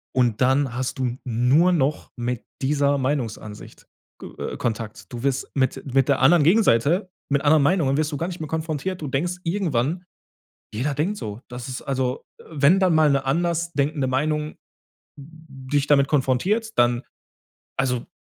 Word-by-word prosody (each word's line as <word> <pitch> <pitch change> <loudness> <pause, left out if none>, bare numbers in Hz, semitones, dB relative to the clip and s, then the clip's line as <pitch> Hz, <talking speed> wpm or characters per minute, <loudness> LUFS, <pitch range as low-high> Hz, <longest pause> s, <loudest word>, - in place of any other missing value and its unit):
Und 120 -4 +1
dann 130 -1 +2
hast 130 +1 -3
du 125 -1 -1
nur 125 +9 +3
noch 150 -3 0
mit 120 0 -3 0.2
dieser 140 +1 +2
Meinungsansicht 120 -6 -4 0.3
g - - -8
äh, - - -5
Kontakt. 115 -1 -4
Du 120 0 -6
wirst 135 -1 -1
mit 130 -2 0
mit 135 0 +3
der 140 -2 +2
anderen 150 +4 +5
Gegenseite 175 - +3 0.2
mit 140 0 +1
anderen 150 0 +5
Meinungen 145 -4 +2
wirst 155 +1 0
du 145 - -3
gar 165 - -2
nicht 180 -2 -7
mehr 155 - -4
konfrontiert. 160 +3 -3
Du 150 - -4
denkst 170 +7 -1
irgendwann: 165 -2 -1 0.7
Jeder 140 +6 -1
denkt 170 +9 -1
so. 105 - -6
Das 125 +1 -7
ist, 130 - -5
also 130 -2 -2 0.2
äh, - - -15
wenn 160 +5 +3
dann 185 -3 +3
mal 155 -1 +5
eine 140 -1 +1
anders 170 +3 0
denkende 145 -2 0
Meinung 150 +3 -1 0.6
d 145 -2 -7
dich 145 0 +2
damit 140 -2 +4
konfrontiert, 175 - 0
dann 120 0 +3 0.8
also, 125 -2 0
140 Hz, 170 wpm, -23 LUFS, 130-160 Hz, 0.8 s, anderen